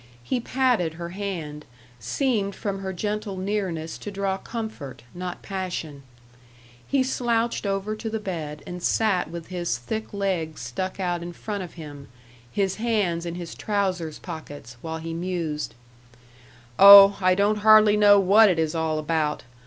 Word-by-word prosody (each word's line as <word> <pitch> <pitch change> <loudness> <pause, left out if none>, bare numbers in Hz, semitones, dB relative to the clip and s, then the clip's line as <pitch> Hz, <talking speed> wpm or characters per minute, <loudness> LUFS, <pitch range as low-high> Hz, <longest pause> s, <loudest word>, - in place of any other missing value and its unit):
He 245 - -1
patted 240 -10 0
her 170 0 -6
hand, 170 -6 -5 0.4
seemed 205 - -1
from 200 -2 -4
her 190 -1 -4
gentle 210 +1 -3
nearness 185 -5 -3
to - - -6
draw 195 -1 -2
comfort 220 - -7
not 180 0 -6
passion. 180 -7 -5 0.9
He 275 -2 +2
slouched 235 -4 -1
over 195 +2 -2
to 220 +1 -5
the 220 - -2
bed, 160 -7 -5
and 180 0 -7
sat 190 -5 +1
with 170 0 -8
his 175 -9 -2
thick 220 - -5
legs 185 -6 -2
stuck 185 +12 -4
out 175 -2 -1
in 175 +1 -7
front 205 +2 -5
of 180 -3 -8
him, 145 -4 -10 0.4
his 195 +3 -1
hands 205 -7 0
in 170 - -4
his 175 -2 -7
trousers 185 -7 -2
pockets, 145 -8 -9
while 160 0 -4
he 165 0 -6
mused: 165 -7 -3 1.0
"Oh, 200 0 +10
I 185 0 +4
don't 205 +2 +2
hardly 215 0 +6
know 205 -1 +6
what 205 +3 +6
it 180 - +1
is 160 -1 0
all 160 -1 -1
about. 155 -1 -1
185 Hz, 155 wpm, -24 LUFS, 165-205 Hz, 1.0 s, Oh